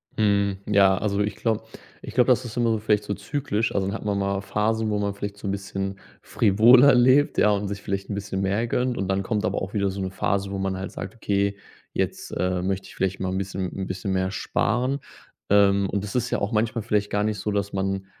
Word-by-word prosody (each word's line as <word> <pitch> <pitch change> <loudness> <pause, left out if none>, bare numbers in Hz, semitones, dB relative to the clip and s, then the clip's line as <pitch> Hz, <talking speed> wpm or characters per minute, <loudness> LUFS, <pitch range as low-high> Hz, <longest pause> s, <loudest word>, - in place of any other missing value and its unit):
Mhm. 100 -2 +2
Ja, 100 -2 +5
also 100 0 -1
ich 105 -1 -1
glaube 110 -1 -1 0.4
ich - - -8
glaube, - - +4
das - - +3
ist 110 - -7
immer 120 -1 +2
so 110 - +1
vielleicht 105 -1 +1
so 105 - -3
zyklisch. 110 +1 -2
Also 95 -1 0
dann 100 - -2
hat 110 - -7
man 100 -1 0
mal 100 0 -1
Phasen, 110 +2 0
wo 105 - 0
man 100 -1 -1
vielleicht 100 0 -6
so 100 - -6
'n - - 0
bisschen 100 0 -4 0.2
frivoler 120 +6 +6
lebt, 130 +4 +4
ja 105 - +5
und 100 0 0
sich 100 0 -5
vielleicht 100 0 -4
'n 100 - -2
bisschen 100 -1 -3
mehr 100 +5 0
gönnt. 125 +1 0
Und 95 - -2
dann 95 0 +1
kommt 105 0 -1
aber - - -1
auch 95 +1 -5
wieder 100 -2 +1
so 95 +1 -5
'ne 95 - -2
Phase, 100 +1 -1
wo 100 - -3
man 95 -1 -2
halt 95 +1 -5
sagt: 95 +2 -7
„Okay, 100 -2 0 0.4
jetzt, - - -2
äh, 90 -1 -1
möchte 95 +1 -2
ich - - -14
vielleicht 95 0 -1
mal 95 - -2
'n 95 - -2
bisschen 95 -1 -3
'n 95 -1 -4
bisschen 95 +1 -3
mehr 95 0 0
sparen“. 125 +7 0 0.5
Ähm. 100 -1 +4
Und 100 0 -2
das 100 +2 -6
ist 125 0 0
ja - - 0
auch 100 - -2
manchmal 110 +1 0
vielleicht 105 -2 0
gar 105 0 0
nicht 105 -1 -1
so, 105 - -2
dass 100 0 -2
man 95 0 -2
100 Hz, 245 wpm, -24 LUFS, 95-105 Hz, 0.5 s, frivoler